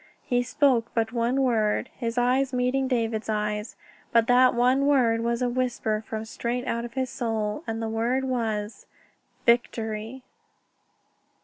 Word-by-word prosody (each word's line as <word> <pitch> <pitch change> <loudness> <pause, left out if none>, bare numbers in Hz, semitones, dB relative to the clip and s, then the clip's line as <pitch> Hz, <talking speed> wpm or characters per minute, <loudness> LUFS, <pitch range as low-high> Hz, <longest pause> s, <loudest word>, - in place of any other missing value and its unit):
He 245 -1 +1
spoke 255 -2 +2
but 225 0 0
one 245 +3 +1
word, 225 -1 +1
his 230 -1 -4
eyes 255 +2 +2
meeting 255 +2 +1
David's 225 -3 -1
eyes, 210 0 -2 0.4
but 230 -1 +4
that 250 +1 +5
one 255 +3 +3
word 240 -5 +3
was 235 +1 -1
a - - +2
whisper 240 -3 -1
from 220 0 -4
straight 240 +3 -3
out 235 -2 -2
of 235 - -9
his 260 -1 -1
soul, 225 +2 -2
and 225 0 -3
the - - -1
word 235 +4 0
was: 225 -4 -3 0.6
"_Victory! 230 0 0
235 Hz, 145 wpm, -26 LUFS, 225-255 Hz, 0.6 s, that